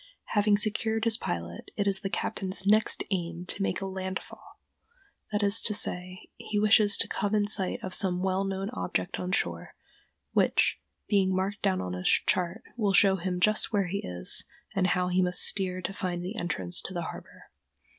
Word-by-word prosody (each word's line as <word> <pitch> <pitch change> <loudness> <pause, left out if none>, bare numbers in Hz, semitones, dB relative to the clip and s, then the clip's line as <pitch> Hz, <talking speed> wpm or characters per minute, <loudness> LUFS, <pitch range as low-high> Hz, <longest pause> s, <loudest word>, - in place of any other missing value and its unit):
Having 205 -1 +3
secured 220 +1 0
his 230 -1 +3
pilot, 85 - -5
it 205 - 0
is 195 -1 +1
the 195 - -4
captain's 190 0 -2
next 215 +2 +2
aim 175 -2 -3
to 190 - -3
make 190 -1 -1
a - - -3
"land 190 0 -4
fall"—that 400 - -10
is 205 +2 +4
to 210 - +2
say, 180 -1 -2
he 210 - -4
wishes 210 -1 +5
to - - +2
come 205 +1 -1
in 205 -1 +2
sight 195 -2 +1
of 185 - -5
some 185 -3 +4
well 190 0 0
known 195 0 -3
object 90 0 -3
on 180 0 -3
shore, - - -2 0.6
which, - - +2 0.3
being 190 -3 +2
marked 195 +2 -2
down 95 0 +1
on 90 -1 -4
his 90 0 -3
chart, 180 +4 +1
will 210 -5 0
show 195 -2 +5
him 180 0 -3
just 215 +4 +3
where 200 -3 +1
he 190 +3 -3
is 90 0 +2 0.3
and 185 -1 +2
how 180 -1 0
he 180 +1 +2
must 180 0 +2
steer 185 -2 0
to 195 - -3
find 175 -2 -4
the 195 +5 -5
entrance 175 -3 -1
to 190 - -7
the 175 - -2
harbor. - - -10
190 Hz, 190 wpm, -28 LUFS, 180-205 Hz, 0.6 s, wishes